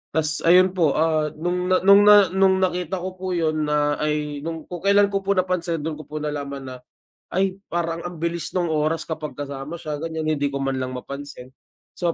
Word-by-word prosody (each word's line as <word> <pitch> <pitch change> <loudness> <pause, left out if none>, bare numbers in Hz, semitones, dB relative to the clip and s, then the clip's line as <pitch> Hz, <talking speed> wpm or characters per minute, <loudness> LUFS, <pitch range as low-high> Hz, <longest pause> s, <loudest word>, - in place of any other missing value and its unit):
tas 155 -1 +1
ayun 185 +1 +6
po, 165 -6 +2
ah, 155 -1 +1
nung 180 +2 -1 0.2
nung 200 +1 +7
na 205 -3 +8
nung 190 0 +4
nakita 180 0 -1
ko 185 0 -5
po 185 0 -3
yun 155 -2 0
na 150 0 +1
ay 150 -1 -1
nung 165 0 -5
kung 175 -2 -6
kailan 200 0 +5
ko 195 - +2
po 200 0 +2
napansin 175 -3 0
dun 155 -1 -4
ko 155 - -11
po 155 - -6
nalaman 140 -2 -4
na, 130 0 -7 0.6
ay 190 +1 0
parang 170 -1 -2
ang 175 -1 -6
bilis 170 0 -2
ng 180 -2 0
oras 155 +1 0
kapag 155 -2 -5
kasama 140 +2 -6
siya 150 -1 -4
ganyan. 160 -1 -4
Hindi 145 0 0
ko 140 - -3
man 135 -1 -1
lang 130 0 -3
mapansin. 140 0 -8 0.5
So 170 -2 0
160 Hz, 205 wpm, -23 LUFS, 150-180 Hz, 0.6 s, na